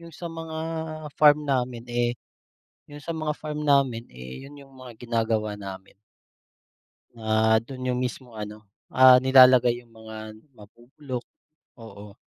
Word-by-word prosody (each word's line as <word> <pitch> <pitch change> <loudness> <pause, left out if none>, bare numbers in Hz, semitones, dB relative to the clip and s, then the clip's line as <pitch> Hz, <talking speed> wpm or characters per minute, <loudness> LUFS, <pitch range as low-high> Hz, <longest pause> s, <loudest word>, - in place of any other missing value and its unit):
yung 170 -2 -13
sa 170 - -7
mga 165 -1 -7 0.6
farm 150 0 +5
namin, 125 -4 -2
eh, 120 0 +1 0.8
yung 145 0 -11
sa 165 - -3
mga 155 -1 -2
farm 150 -1 -6
namin, 135 -5 +1
eh, 65 - -10
yun 145 - -14
yung 140 -1 -15
mga 130 -3 -12
ginagawa 110 -2 -1
namin. 95 -1 -9 1.2
Ah, 110 0 +2
dun 130 +1 -8
yung 125 0 -1
mismo 125 -1 -6
ano, 105 0 -8 0.2
ah, 130 -1 +7
nilalagay 130 -2 +6
yung 115 - -26
mga 110 -1 -10 0.2
nabubulok, 120 +4 -9 0.5
oo. 105 -3 -12
125 Hz, 135 wpm, -25 LUFS, 110-140 Hz, 1.2 s, ah